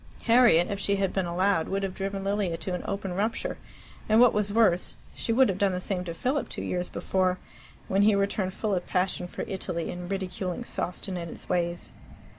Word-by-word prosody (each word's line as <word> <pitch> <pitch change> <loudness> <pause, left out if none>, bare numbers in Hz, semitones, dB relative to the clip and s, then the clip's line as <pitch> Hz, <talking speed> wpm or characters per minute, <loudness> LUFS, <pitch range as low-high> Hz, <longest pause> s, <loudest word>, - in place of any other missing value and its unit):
Harriet, 230 -8 +6
if 200 - -2
she 200 0 +1
had 195 -1 0
been 190 -2 0
allowed, 175 -1 +1
would 195 +1 -1
have 190 -1 -2
driven 195 0 -3
Lilia 195 -4 0
to 185 - -4
an 180 - -2
open 195 -2 -3
rupture, 210 +5 -2 0.5
and, 215 +1 +5
what 245 -1 +7
was 210 -1 0
worse, 205 -5 +3 0.2
she - - -1
would 260 +3 +5
have 195 -1 -2
done 200 -2 +3
the 180 - -1
same 185 -1 -2
to 170 -2 -5
Philip 265 - -1
two - - -5
years 180 0 -2
before, 185 -1 0 0.5
when 195 +1 +2
he 210 0 +5
returned 200 -1 0
full 215 -2 -1
of 180 -2 -1
passion 180 -1 0
for - - -5
Italy, 180 -3 -3
and 180 0 -6
ridiculing 190 +1 -3
Sawston 185 -3 -3
and 170 -1 -5
its - - -9
ways. 175 -1 -1
190 Hz, 210 wpm, -27 LUFS, 180-200 Hz, 0.5 s, what